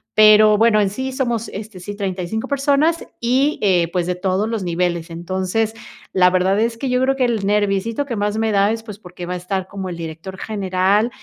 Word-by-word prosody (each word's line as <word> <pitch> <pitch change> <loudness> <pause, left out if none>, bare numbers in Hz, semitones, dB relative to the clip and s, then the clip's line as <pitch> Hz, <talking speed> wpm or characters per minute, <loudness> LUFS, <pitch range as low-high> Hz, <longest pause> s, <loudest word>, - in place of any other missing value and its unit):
pero, 215 0 +7
bueno, 225 -2 +4
en 205 -2 +2
sí 260 +5 -4
somos, 240 -4 -2
este, 205 -1 -8
sí, 205 +3 -7
35 195 +3 -3
personas 285 +4 +1
y, 260 +5 +1
eh, 180 -4 +3
pues, 175 -1 0
de 180 - 0
todos 190 +3 0
los 225 -3 -3
niveles. 175 -1 -1
Entonces, 185 +6 -2 0.4
la 180 -1 +5
verdad 185 +2 +2
es 230 0 0
que 270 - -3
yo 250 0 +1
creo 270 +1 +2
que 260 - +1
el 230 -4 -1
nerviecito 210 +5 0
que 240 -4 -4
más 205 +1 -1
me 220 0 +1
da 200 +1 +3
es, 225 0 -4
pues, 210 -2 -9
porque 180 -2 -9
va 180 - -4
a - - -3
estar 185 +1 -3
como 190 -1 -6
el 175 - -6
director 165 +3 -7
general, 200 +2 +1
205 Hz, 215 wpm, -20 LUFS, 185-230 Hz, 0.4 s, pero